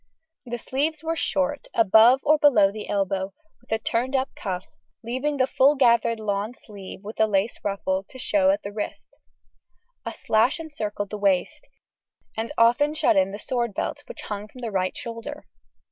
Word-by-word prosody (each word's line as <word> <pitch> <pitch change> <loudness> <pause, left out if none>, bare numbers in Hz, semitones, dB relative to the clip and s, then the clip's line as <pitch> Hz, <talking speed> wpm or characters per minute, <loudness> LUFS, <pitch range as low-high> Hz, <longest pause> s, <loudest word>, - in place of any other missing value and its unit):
The 240 0 -3
sleeves 295 +6 -2
were 325 +1 -1
short, 290 -2 -1
above 225 +4 +6
or 305 +1 +4
below 220 -10 +5
the 210 0 -8
elbow, 195 -1 -1 0.2
with 245 - -24
a 220 - +3
turned 235 +4 -1
up 265 +1 0
cuff, 185 -2 -4 0.4
leaving 260 +5 -2
the 260 - +3
full 270 +2 +4
gathered 235 -3 +3
lawn 210 +2 -2
sleeve 200 -4 -11
with 215 +2 -9
a 220 - +5
lace 200 +2 0
ruffle 195 -1 -1
to 260 - -11
show 285 +2 +2
at 300 +1 +1
the 200 - -5
wrist. 210 0 -7 0.8
A - - -4
sash 230 +9 +1
encircled 210 -11 -5
the 210 - -5
waist, 200 - 0 0.7
and 225 +3 -3
often 275 +6 +4
shut 325 +1 +3
in 285 -8 +3
the 205 - -5
sword 235 -1 -2
belt, - - -3
which - - -8
hung 210 0 -5
from 250 +4 -14
the 230 -2 -4
right 185 -2 -1
shoulder. 235 +6 -7
230 Hz, 175 wpm, -24 LUFS, 205-280 Hz, 0.8 s, above